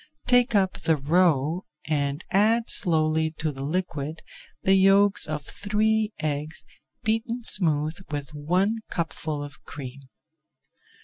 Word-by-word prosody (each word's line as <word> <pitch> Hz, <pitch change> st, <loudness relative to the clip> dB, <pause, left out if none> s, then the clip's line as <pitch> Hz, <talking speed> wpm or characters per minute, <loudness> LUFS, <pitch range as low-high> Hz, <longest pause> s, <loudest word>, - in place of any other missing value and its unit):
Take 245 Hz, -2 st, +3 dB
up 190 Hz, -2 st, +1 dB
the 160 Hz, -1 st, +2 dB
roe 160 Hz, +2 st, +1 dB, 0.2 s
and 145 Hz, 0 st, -1 dB
add 225 Hz, +4 st, +3 dB
slowly 160 Hz, -2 st, +3 dB
to 155 Hz, -1 st, -1 dB
the 135 Hz, -1 st, -8 dB
liquid 155 Hz, -1 st, -3 dB, 0.4 s
the 190 Hz, -, +4 dB
yolks 195 Hz, +1 st, +4 dB
of 150 Hz, -1 st, -4 dB
three 215 Hz, +5 st, 0 dB
eggs 155 Hz, +1 st, -4 dB, 0.4 s
beaten 225 Hz, +2 st, -1 dB
smooth 160 Hz, -6 st, +1 dB
with 145 Hz, -1 st, -5 dB
one 180 Hz, +9 st, 0 dB
cupful 155 Hz, -3 st, -3 dB
of 145 Hz, -2 st, -11 dB
cream. 135 Hz, -2 st, -9 dB
160 Hz, 120 wpm, -25 LUFS, 150-200 Hz, 0.4 s, the